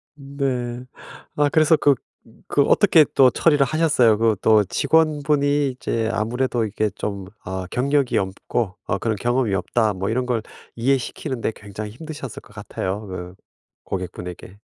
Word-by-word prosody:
네. 130 -4 -3 0.5
아 145 0 +3
그래서 155 +1 +4
그 145 -2 +4 0.5
그 - - +2
어떻게 155 -2 +5
또 130 -1 +7
처리를 145 +1 +3
하셨어요? 145 -7 +3
그 110 0 +2
또 110 -1 +5
직원분이 145 - +2
이제 115 -3 -2
아무래도 120 +2 -1
이게 105 +1 -1
좀 100 0 -5 0.2
어 95 0 -4
경력이 140 +1 +1
없고 95 +1 -2
어 100 - -1
그런 115 -2 -1
경험이 120 -1 0
없다 105 +3 0
뭐 95 +1 -3
이런 125 +3 0
걸 120 -3 0 0.3
이해시키는 130 +1 -1
데 - - 0
굉장히 105 +1 -8
힘드셨을 145 -1 -8
것 - - -19
같아요, 100 0 -5
그 90 -1 -7 0.5
고객분에게. 90 +1 -7
120 Hz, 300 characters per minute, -22 LUFS, 105-140 Hz, 0.5 s, 또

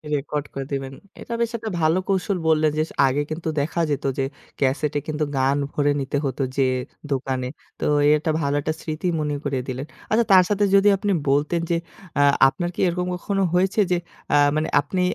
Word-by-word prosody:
Record 145 +1 -3
করে 135 -1 -4
দিবেন। 135 -1 -3 0.3
এটা 235 - -6
বেশ 235 0 0
একটা 220 0 -5
ভালো 160 +3 +3
কৌশল 195 0 0
বললেন 155 -1 +3
যে, - - +3 0.2
আগে 140 +3 +1
কিন্তু 160 +1 -3
দেখা 160 +4 -1
যেত 140 - -1
যে 135 - +1 0.4
ক্যাসেটে 145 +2 +1
কিন্তু 155 0 -1
গান 135 +2 +2
ভরে 145 0 +1
নিতে 140 +1 -2
হতো 135 +1 -1
যেয়ে 130 -1 +2 0.3
দোকানে। 130 -1 -1 0.3
তো - - -2 0.3
একটা 155 +1 -1
ভালো 140 0 0
একটা 155 +2 -1
স্মৃতি 155 +3 -3
মনে 150 -1 -1
করিয়ে 135 -3 -1
দিলেন। 130 +2 -4 0.3
আচ্ছা, 230 +1 +3
তার 185 -1 +8
সাথে 205 0 +1
যদি 195 +1 +5
আপনি 205 +1 -1 0.2
বলতেন 150 +5 +1
যে 170 - +2 0.4
আ - - +5 0.3
আপনার 175 +5 -2
কি - - -10
এরকম 180 +1 -1
কখনো 195 +2 -1
হয়েছে 190 +4 +2
যে 175 - +3 0.4
আ - - +6 0.2
মানে 155 +1 0
আপনি 180 +6 -2
155 Hz, 190 wpm, -23 LUFS, 140-180 Hz, 0.4 s, তার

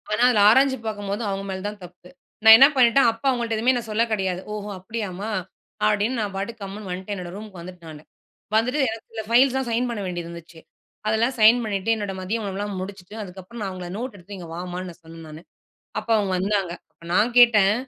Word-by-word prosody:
ஆனா 215 +3 +1
அதில 230 -5 +4
ஆராய்ஞ்சு 265 +3 +4
பாக்கும்போது 205 0 -3
அவங்க 195 0 -3
மேல 190 0 -5
தான் 205 0 -7
தப்பு. 180 0 -14 0.3
நான் 220 0 +11
என்ன 270 - +9
பண்ணிட்டேன். 255 0 +5
அப்போ 225 +3 -13
அவங்கள்ட்ட 235 -3 0
எதுவுமே 245 +4 +3
நான் 230 -2 -6
சொல்ல 220 +2 +2
கெடையாது. 190 -4 -1
ஓஹோ! 210 0 -5
அப்டியாமா. 200 0 -5 0.6
அப்டின்னு 210 +4 +1
நான் 205 -2 -3
பாட்டுக்கு 215 +3 -5
கம்முனு 195 +1 -7
வந்துட்டேன் 185 +3 -6
நானு. - - -5
என்னோட 175 0 -8
ரூமுக்கு 205 -3 -9
வந்துட்டேன் 175 -2 -11
நானு. 150 0 -12 0.5
வந்துட்டு 250 +6 +2
எனக்கு 225 0 -9
இந்த 220 - -3
ஃபைல்ஸ்லாம் 260 +2 +3
சைன் 240 +2 +1
பண்ண 230 -3 -4
வேண்டியது 175 -2 -4
இருந்துச்சு. 170 -1 -11 0.5
அதெல்லாம் 225 +4 +1
சைன் 220 +3 +7
பண்ணிட்டு, 210 0 0
என்னோட 205 -3 -4
மதிய 215 +5 -2
உணவுலாம் 200 +1 -4
முடிச்சுட்டு 190 +1 -8
அதுக்கப்புறம் 190 +4 -10
நான் 195 -2 -3
அவங்கள 180 -1 -7
நோட் 245 +1 -5
எடுத்துட்டு 200 +1 -10
இங்க 175 -2 -9
வாம்மான்னு 180 +1 -5
நான் 175 +1 -14
சொன்னேன் 165 0 -12
நானு. 155 +1 -10 0.6
அப்போ 230 - -5
அவங்க 200 -3 0
வந்தாங்க. 195 -1 0 0.2
அப்போ 170 - -18
நான் 230 +6 +3
கேட்டேன், 210 -5 +6
205 Hz, 200 wpm, -23 LUFS, 185-230 Hz, 0.6 s, நான்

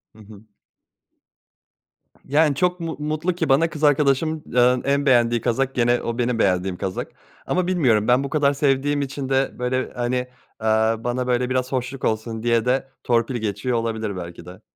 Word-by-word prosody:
Hı - - -17
hı. 105 -1 -14 1.8
Yani 150 +1 +2
çok 180 +4 0
mu 165 -1 -4
mutlu 155 +4 -2
ki 165 -3 -2
bana 150 +5 +4
kız 155 -1 -8
arkadaşımın, 150 +2 +2
eee, 125 0 +4
en 140 +1 +1
beğendiği 120 -3 +3
kazak 130 +3 -1
gene 120 0 +2
o 115 +1 -4
benim 120 -1 0
beğendiğim 90 -2 +1
kazak 95 -1 -4 0.3
ama 180 -1 0
bilmiyorum 125 - +2
ben 125 +3 +4
bu 140 - -4
kadar 145 -1 +2
sevdiğim 145 +1 +1
için 135 -1 -4
de 135 0 +1
böyle 130 +1 -1
hani, 120 +1 -1 0.5
eee, 110 - -2 0.4
bana 125 +1 -2
böyle 125 0 +1
biraz 130 0 -1
hoşluk 130 0 -3
olsun 110 0 -2
diye 115 -1 +2
de 130 +2 +1 0.2
torpil 120 +1 +1
geçiyor 110 +2 -2
olabilir 110 -3 -3
belki 85 -1 -8
de. 90 +1 -12
125 Hz, 170 wpm, -22 LUFS, 115-140 Hz, 1.8 s, bana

